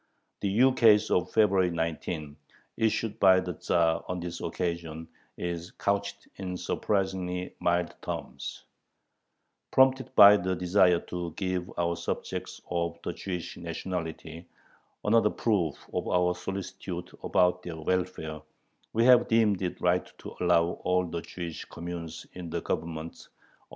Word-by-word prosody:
The 100 - -1
ukase 115 -5 +5
of 90 -1 +1
February 100 -4 +4
19, 80 -2 -3 0.4
issued 110 -1 0
by 95 -1 +7
the 90 -1 -3
Tzar 85 0 +1
on 90 0 -3
this 85 0 -5
occasion, 85 -2 -3 0.3
is 85 0 -4
couched 100 0 -1
in 90 -2 -4
surprisingly 95 -2 -1
mild 85 0 +1
terms: 70 +2 -6 1.1
Prompted 130 -1 +3
by 100 +1 +10
the 95 0 -1
desire 90 0 +4
to 85 -2 -5
give 90 -2 -2
our 85 0 +1
subjects 85 - -4
of 85 -1 -1
the 85 - -3
Jewish 90 -2 -5
nationality 80 -2 -5 0.6
another 105 0 +4
proof 95 -12 -1
of - - -2
our 90 0 +2
solicitude 90 -1 -6
about 90 0 +2
their 85 -2 -7
welfare, 80 -2 -2 0.5
we 115 +1 +3
have 125 -1 +7
deemed 110 -4 +3
it 90 -2 -3
right 90 0 +1
to - - -9
allow 85 -1 +2
all 90 0 +2
the 85 -1 -4
Jewish 85 -2 -6
communes 85 -1 -7
in 90 -2 -7
the - - -2
Governments 80 0 -4
90 Hz, 130 wpm, -28 LUFS, 85-95 Hz, 1.1 s, by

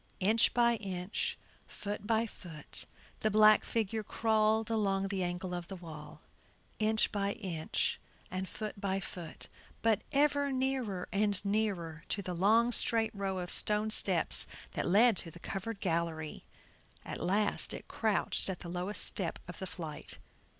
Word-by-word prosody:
Inch 215 +4 +4
by 235 -1 +4
inch, 190 -1 -3 0.3
foot 205 0 -6
by 225 0 +2
foot 165 -8 -2 0.3
the 215 - +1
black 215 0 +6
figure 220 -1 -1
crawled 220 +1 +1
along 195 -3 +1
in 195 - -2
the 195 -1 -1
angle 180 +1 -2
of 175 -1 -4
the 195 - -7
wall; 160 -4 -10 0.6
inch 220 0 +2
by 200 -1 -1
inch 170 -6 -2 0.3
and 185 +1 -3
foot 210 -2 -6
by 195 -1 0
foot, 175 -4 -8 0.4
but 225 -3 +3
ever 285 0 +2
nearer 260 -8 -1
and 200 -1 +1
nearer 195 -6 -1
to 200 - -1
the 180 - -3
long 220 +7 +4
straight 225 -2 +2
row 195 -2 -2
of 180 -1 -4
stone 215 +1 +5
steps - - +2 0.2
that - - -2
led 215 +5 +6
to 170 - -2
the 165 - -12
covered 195 +4 -5
gallery. 165 -4 -2 0.6
At - - -6
last 205 +3 +2
it - - -3
crouched 210 -3 0
at 185 - -4
the 170 - -7
lowest 180 +4 -1
step 180 -4 +1
of 175 - -9
the 190 - -4
flight. 160 -5 -6
200 Hz, 155 wpm, -32 LUFS, 180-220 Hz, 0.6 s, black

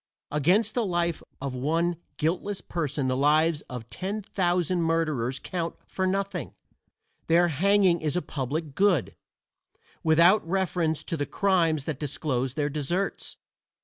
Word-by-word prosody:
Against 185 +10 +2
the 240 - +1
life 175 -4 0 0.2
of 140 -1 -4
one 165 +7 0 0.2
guiltless 185 +5 -1
person 150 -5 -2
the 130 - +1
lives 150 +3 +3
of 125 -3 -7
ten 200 +3 -4
thousand 180 -2 0
murderers 155 -7 0
count 170 -3 -4
for 190 0 -2
nothing; 195 -5 -2 0.7
their 175 +1 +4
hanging 185 +2 +3
is 155 0 -1
a 180 - +1
public 145 +2 -3
good, 190 - +2 0.9
without 170 +6 +5
reference 175 -3 0
to - - -3
the 145 -2 -2
crimes 165 -7 +1
that 150 -4 -3
disclose 135 -3 -2
their 145 -2 0
deserts. 155 +7 -2
165 Hz, 135 wpm, -27 LUFS, 145-185 Hz, 0.9 s, without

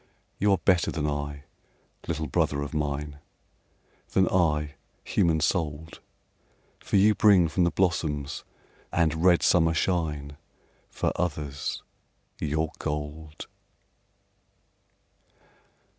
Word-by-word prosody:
You 105 0 +3
are 95 - +4
better 90 -1 +2
than 75 -3 -2
I, 70 -1 -3 0.6
little 80 -1 -2
brother 75 -1 0
of 70 - -7
mine, 75 -1 -3 0.9
Than 95 -1 +4
I, 75 -5 +1 0.3
human 80 -2 +2
souled, 80 -1 -2 0.8
For - - -3
you 105 +2 +6
bring 100 -5 +5
from 85 +3 +1
the - - +3
blossoms 80 -5 -1 0.5
and 80 -1 +1
red 90 -2 +5
summer 80 -2 +4
shine, 75 -5 -1 0.5
For - - -1
others, 75 -5 -3 0.6
your 80 +1 -1
gold. 75 +1 -5
80 Hz, 100 wpm, -27 LUFS, 75-85 Hz, 0.9 s, you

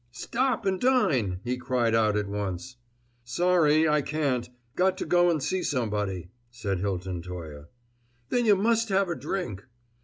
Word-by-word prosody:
"Stop 235 - -1
and 190 -1 0
dine!" 145 - +2
he 125 +1 -2
cried 125 -2 0
out 110 -2 +3
at 105 -1 -1
once. 100 +4 -4 0.5
"Sorry 160 +3 +3
I 150 -1 +3
can't; 140 -5 -1 0.3
got 185 +1 +2
to - - -3
go 175 0 +4
and 155 -5 0
see 185 0 0
somebody," 105 - -2 0.2
said 100 -6 -3
Hilton 95 -2 -3
Toye. 80 -5 -8 0.6
"Then 245 -2 +1
you 205 - +7
must 225 +3 +1
have 195 -1 +2
a 170 - -1
drink." 130 - -4
125 Hz, 155 wpm, -27 LUFS, -, 0.6 s, you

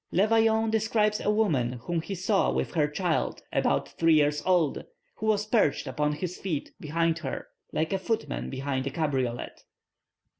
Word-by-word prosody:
Le 190 +4 +4
Vaillant 225 0 +3
describes 215 -1 +2
a - - 0
woman 160 - +2
whom 160 +8 -3
he 195 +4 -5
saw 195 +2 +2
with - - -2
her 155 -4 +2
child 165 +2 -1
about - - +1
three 165 -1 +3
years 150 0 +3
old, 175 -6 +2 0.3
who 220 - -3
was 210 -1 +2
perched 215 - +2
upon 150 0 0
his 180 +4 -4
feet 165 -7 -3
behind 165 +2 0
her, 140 -5 -5 0.2
like 160 +5 -1
a 195 - 0
footman 225 +4 -2
behind 135 0 -2
a - - +1
cabriolet. 135 -5 -2
170 Hz, 165 wpm, -28 LUFS, 150-210 Hz, 0.3 s, Le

